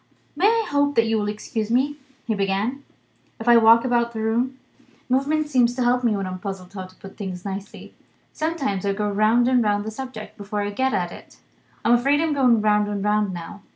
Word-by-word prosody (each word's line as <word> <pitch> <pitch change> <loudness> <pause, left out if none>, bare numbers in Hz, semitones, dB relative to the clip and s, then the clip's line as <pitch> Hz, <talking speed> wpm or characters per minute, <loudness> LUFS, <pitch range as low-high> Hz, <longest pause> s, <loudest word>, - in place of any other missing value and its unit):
"May 385 - +3
I 455 0 +2
hope 285 0 +1
that 230 - +4
you 225 -1 +1
will 205 - -2
excuse 215 +1 -4
me," 270 +5 +1 0.3
he 225 - 0
began, 200 +7 -1 0.6
"if 225 - -7
I 240 0 +8
walk 230 +2 +6
about 235 -1 +1
the 220 - -5
room? 235 +4 0 0.5
Movement 290 +4 +1
seems 245 -4 +2
to 255 - 0
help 245 +1 +2
me 220 -4 +2
when 195 - -3
I 185 - -5
am 185 - -6
puzzled 190 -1 -7
how 190 -2 -6
to 185 - -20
put 195 0 -13
things 185 -3 -6
nicely. 195 0 -7 0.4
Sometimes 300 - -2
I 200 0 0
go 210 +1 -2
round 215 +4 +3
and 250 -2 +3
round 205 -1 0
the 220 - -4
subject, 235 -2 -8
before 205 0 -4
I 205 - -3
get 260 +5 0
at 175 -2 -1
it. - - -13 0.5
I'm 235 - +5
afraid 275 +4 +3
I'm 320 -1 +1
going 250 -5 +3
round 210 -1 +2
and 205 -1 -3
round, 210 -1 +1
now. 175 +4 -8
225 Hz, 220 wpm, -23 LUFS, 205-255 Hz, 0.6 s, I